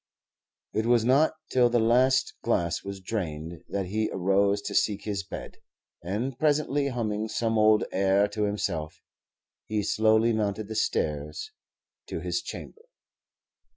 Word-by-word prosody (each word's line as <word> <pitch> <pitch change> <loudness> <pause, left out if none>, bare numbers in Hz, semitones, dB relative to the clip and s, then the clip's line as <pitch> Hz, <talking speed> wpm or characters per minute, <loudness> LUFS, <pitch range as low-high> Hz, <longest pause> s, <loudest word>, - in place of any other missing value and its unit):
It 110 +1 0
was 120 -2 +4
not 140 +6 +4 0.2
till 125 -2 +4
the 120 - +2
last 130 +3 +3
glass 85 -1 0
was 100 0 -6
drained 85 -5 -4
that 100 -1 -2
he 110 +4 -1
arose 100 +2 +2
to - - -4
seek 105 -3 +1
his 100 -2 -2
bed, - - -8 0.5
and 115 +9 -3
presently 145 -2 +2
humming 110 -4 -2
some 115 0 -1
old 110 0 +5
air 100 +1 +3
to 105 0 -1
himself, 85 -7 -3 0.7
he 105 -1 -1
slowly 110 +2 +3
mounted 105 -1 -2
the 110 - -5
stairs 75 - -1 0.6
to - - -4
his - - -2
chamber. 450 - -8
110 Hz, 140 wpm, -27 LUFS, 100-120 Hz, 0.7 s, old